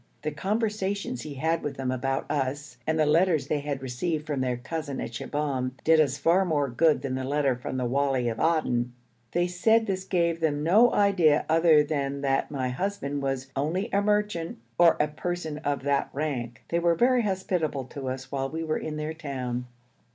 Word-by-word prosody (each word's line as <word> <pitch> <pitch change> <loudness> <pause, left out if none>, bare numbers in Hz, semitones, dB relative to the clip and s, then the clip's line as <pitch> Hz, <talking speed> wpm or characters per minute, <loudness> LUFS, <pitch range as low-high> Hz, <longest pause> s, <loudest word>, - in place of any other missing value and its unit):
The 155 - -1
conversations 200 - -2
he 150 -2 -7
had 160 +4 0
with 145 - -4
them 130 -1 -1
about 135 +1 -1
us, 140 -1 -2
and 160 0 +1
the 155 - +3
letters 160 +1 +3
they 150 - +1
had 140 -2 -4
received 150 +5 -2
from 145 -4 -2
their 125 -1 0
cousin 145 +2 -5
at - - -4
Shibahm, 130 0 -2
did 160 0 +5
us 140 -3 +2
far 170 +6 +3
more 150 -6 0
good 150 +5 +2
than 135 -2 -2
the 130 0 -2
letter 140 -1 +1
from 125 +1 -5
the 125 - -1
wali 135 -1 +1
of 115 -1 -2
Aden. 125 -7 +1 0.4
They 175 +1 +2
said 220 +6 +3
this 190 -2 -2
gave 170 -3 0
them 150 -2 0
no 215 +9 +5
idea 180 -7 +3
other 160 -1 +5
than 140 -2 -2
that 135 -1 +1
my 130 -3 -2
husband 145 -1 -2
was 135 -1 -3
'only 175 +10 -1
a 200 - +3
merchant' 210 -5 0 0.2
or 170 -1 +6
a 150 - +3
person 160 0 -4
of 145 -3 -2
that 140 -1 +1
rank. 125 -6 -3
They 170 - +1
were 170 0 +3
very 250 +5 +4
hospitable 180 - -1
to 135 -2 -4
us 130 0 -6
while 135 -1 -2
we 160 +3 -4
were 155 -1 -1
in 155 -1 -5
their 155 +1 -3
town. 130 -6 -4
150 Hz, 195 wpm, -27 LUFS, 135-170 Hz, 0.4 s, or